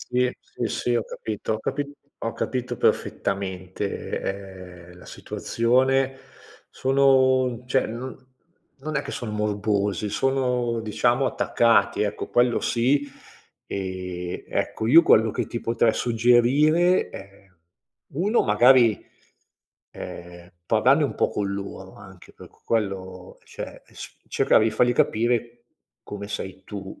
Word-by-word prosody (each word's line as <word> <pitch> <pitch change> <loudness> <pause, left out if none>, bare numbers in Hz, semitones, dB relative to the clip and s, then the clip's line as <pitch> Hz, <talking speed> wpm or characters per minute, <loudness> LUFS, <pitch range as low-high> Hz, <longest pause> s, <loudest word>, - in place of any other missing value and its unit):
Sì, 125 0 0
sì, - - -5
sì, 120 - -1
ho 115 - -1
capito 110 0 -4
ho - - -3
capi 145 +3 -3 0.3
ho 115 - -2
capito 125 -1 -3
perfettamente, 95 -2 -3
ehm, 90 - -15
la - - -15
situazione. 130 +3 0 0.5
Sono 130 -2 +3
cioè 130 +1 +1
no 120 +4 -6 0.6
non 155 +2 -4
è 140 - 0
che - - -7
son 110 -3 -5
morbosi, 105 -1 -1
sono 125 -2 0
diciamo 120 +4 +1
attaccati 115 -3 +2
ecco, 105 0 -3
quello 120 0 +2
sì. 140 +5 +1 0.6
Ehm, 90 -2 -5
ecco 110 - -2
io 165 +6 +8
quello 110 -6 +4
che - - -3
ti 120 - -5
potrei 115 -1 +1
suggerire 130 +10 +3
è: 100 0 -12 0.7
1 200 +10 +2
magari, 120 +1 +4 0.9
ehm, 85 0 -10 0.2
parlarne 130 - +4
un 140 - -2
po' - - +1
con 100 -1 -2
loro 100 0 -7
anche - - -15
perché - - -16
quello 95 -4 -3
cioè, - - -9
e - - -23
s - - -10
cercare - - +3
di 110 - +2
fargli 120 +3 +2
capire 120 0 0 0.4
come 100 0 -7
sei 95 -2 -6
tu, 95 -2 -8
115 Hz, 125 wpm, -24 LUFS, 100-130 Hz, 0.9 s, io